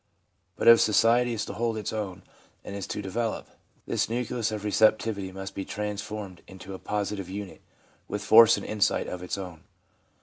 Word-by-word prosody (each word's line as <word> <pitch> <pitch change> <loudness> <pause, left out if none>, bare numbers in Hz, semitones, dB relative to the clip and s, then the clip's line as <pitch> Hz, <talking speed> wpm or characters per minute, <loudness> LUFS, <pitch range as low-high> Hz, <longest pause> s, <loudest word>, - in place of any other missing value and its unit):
But - - -2
if 115 0 +9
society 115 +3 +4
is 110 - -2
to - - -6
hold 115 +1 -1
its 105 -1 -4
own 100 -5 -4 0.4
and 100 - -7
is 100 - -5
to 105 - -4
develop, 110 +4 -3 0.4
this - - -1
nucleus 120 -1 -2
of 105 -1 -4
receptivity 105 -1 +2
must 95 +1 -7
be 95 - -4
transformed 105 -2 -5
into 95 +1 -10
a 95 - -7
positive 100 -2 -3
unit, 100 0 -7 0.5
with 105 0 -4
force 115 +1 +8
and - - -6
insight 105 -2 +1
of 90 - -6
its 90 - -4
own. 90 -4 -8
105 Hz, 175 wpm, -27 LUFS, 95-110 Hz, 0.5 s, if